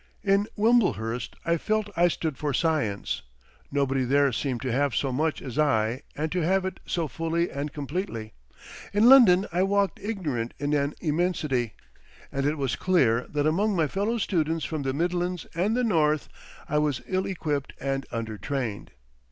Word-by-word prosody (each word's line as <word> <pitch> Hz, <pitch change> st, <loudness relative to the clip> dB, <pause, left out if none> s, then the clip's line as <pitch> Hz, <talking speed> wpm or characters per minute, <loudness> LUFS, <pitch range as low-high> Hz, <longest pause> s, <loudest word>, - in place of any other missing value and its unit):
In 200 Hz, +1 st, +3 dB
Wimblehurst 125 Hz, -, +1 dB
I 170 Hz, 0 st, +2 dB
felt 215 Hz, +3 st, -1 dB
I 175 Hz, +1 st, +5 dB
stood 160 Hz, -3 st, -2 dB
for 145 Hz, 0 st, -2 dB
Science; 145 Hz, -, 0 dB, 0.5 s
nobody 135 Hz, -2 st, +1 dB
there 140 Hz, +2 st, +3 dB
seemed 125 Hz, +1 st, -2 dB
to 130 Hz, -, -1 dB
have 140 Hz, +1 st, +1 dB
so 135 Hz, -, 0 dB
much 155 Hz, +4 st, -1 dB
as 130 Hz, +1 st, -5 dB
I 125 Hz, -4 st, +2 dB
and 155 Hz, +1 st, -2 dB
to 180 Hz, -, 0 dB
have 185 Hz, +3 st, +2 dB
it 190 Hz, -, -4 dB
so 170 Hz, -3 st, -1 dB
fully 165 Hz, +5 st, -1 dB
and 140 Hz, +1 st, -4 dB
completely. 140 Hz, -, -4 dB, 0.6 s
In 210 Hz, +3 st, +5 dB
London 215 Hz, -8 st, +8 dB
I 175 Hz, +2 st, +1 dB
walked 200 Hz, -1 st, +1 dB
ignorant 155 Hz, -, -3 dB
in 145 Hz, +1 st, -1 dB
an 145 Hz, 0 st, 0 dB
immensity, 150 Hz, -, 0 dB, 0.6 s
and 140 Hz, +1 st, 0 dB
it 150 Hz, +2 st, 0 dB
was 135 Hz, -4 st, -1 dB
clear 130 Hz, -11 st, +2 dB
that 145 Hz, -1 st, 0 dB
among 195 Hz, +7 st, +2 dB
my 165 Hz, -3 st, +3 dB
fellow 200 Hz, -, -1 dB
students 165 Hz, -6 st, 0 dB
from 155 Hz, -2 st, -3 dB
the 135 Hz, -1 st, -1 dB
midlands 175 Hz, +3 st, -1 dB
and 200 Hz, +8 st, +1 dB
the 250 Hz, -, +1 dB
north 155 Hz, -, +2 dB, 0.4 s
I 150 Hz, -, +1 dB
was 150 Hz, -4 st, 0 dB
ill 185 Hz, 0 st, -1 dB
equipped 150 Hz, -7 st, -2 dB
and 135 Hz, 0 st, -2 dB
under 110 Hz, -2 st, -4 dB
trained. 125 Hz, -8 st, -4 dB
155 Hz, 170 wpm, -26 LUFS, 135-180 Hz, 0.6 s, London